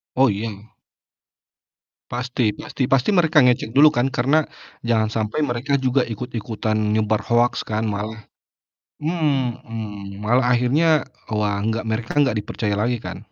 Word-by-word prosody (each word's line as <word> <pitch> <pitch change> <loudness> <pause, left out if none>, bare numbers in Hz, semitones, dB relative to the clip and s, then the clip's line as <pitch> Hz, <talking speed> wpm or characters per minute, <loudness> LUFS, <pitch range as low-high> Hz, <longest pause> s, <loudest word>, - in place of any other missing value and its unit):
Oh, 130 -1 +5
iya. 105 +1 -5 1.4
Pasti, 125 -3 -1
pasti. 130 +3 -3
Pasti 135 +6 +3
mereka 160 -5 +4
ngecek 125 -3 +2
dulu 150 +2 +7
kan? 125 +1 +1
Karena 135 +6 +2 0.4
jangan 110 -2 +1
sampai 110 +5 -2
mereka 135 +3 0
juga 130 0 +1
ikut-ikutan 110 -2 -3 0.2
nyebar 110 0 +1
hoaks 120 +1 +2
kan 110 +1 -1
malah 110 +2 -4 0.8
mhm. 115 - -2
Malah 120 +4 +3
akhirnya, 145 +5 +3 0.3
wah, 105 -1 0
enggak 110 +1 -1
mereka 110 +1 -2
enggak 135 -7 +3
dipercaya 105 0 -2
lagi 120 +3 0
kan? - - -6
120 Hz, 130 wpm, -22 LUFS, 110-130 Hz, 1.4 s, dulu